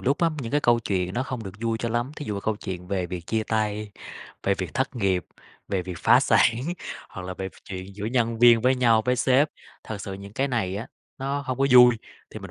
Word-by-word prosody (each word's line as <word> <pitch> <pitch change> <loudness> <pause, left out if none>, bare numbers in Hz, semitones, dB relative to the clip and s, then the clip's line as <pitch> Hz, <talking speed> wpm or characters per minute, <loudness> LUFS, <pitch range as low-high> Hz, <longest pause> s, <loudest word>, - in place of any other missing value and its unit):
lúc 140 +4 +1
á, 165 - +4
những 115 - -6
cái 145 - +3
câu 120 -3 +4
chuyện 95 -4 -1
nó 125 - 0
không 125 -3 -5
được 95 - -7
vui 115 -1 -1
cho 115 - -2
lắm, 120 +4 -1
thí 150 - -6
dụ 105 - -3
mà 100 - -3
câu 110 +1 -1
chuyện 90 -3 -6
về 95 -2 -1
việc 85 -1 -6
chia 110 -1 0
tay, 105 -1 -1 0.5
về 100 - +2
việc 95 -1 -5
thất 130 +1 -1
nghiệp, 95 -6 +1 0.4
về 95 -2 -1
việc 90 -2 -7
phá - - +5
sản - - +5 0.6
hoặc 95 - -8
là 95 - -5
về 95 +1 -4 0.2
chuyện 95 0 -7
giữa 105 +1 -5
nhân 115 -1 0
viên 120 -1 +7
với 130 +3 +3
nhau, 115 -3 +3
với 125 0 +2
sếp, 130 +4 +3 0.4
thật 110 -2 -6
sự 100 - -6
những 100 +1 -10
cái 135 +5 0
này 105 -7 -1
á, 110 +4 -5 0.3
nó 140 +2 -2
hông 130 -2 -4
có 135 - +3
vui, 125 -1 +8 0.3
thì - - -7
mình - - -9
110 Hz, 250 wpm, -25 LUFS, 95-125 Hz, 0.6 s, vui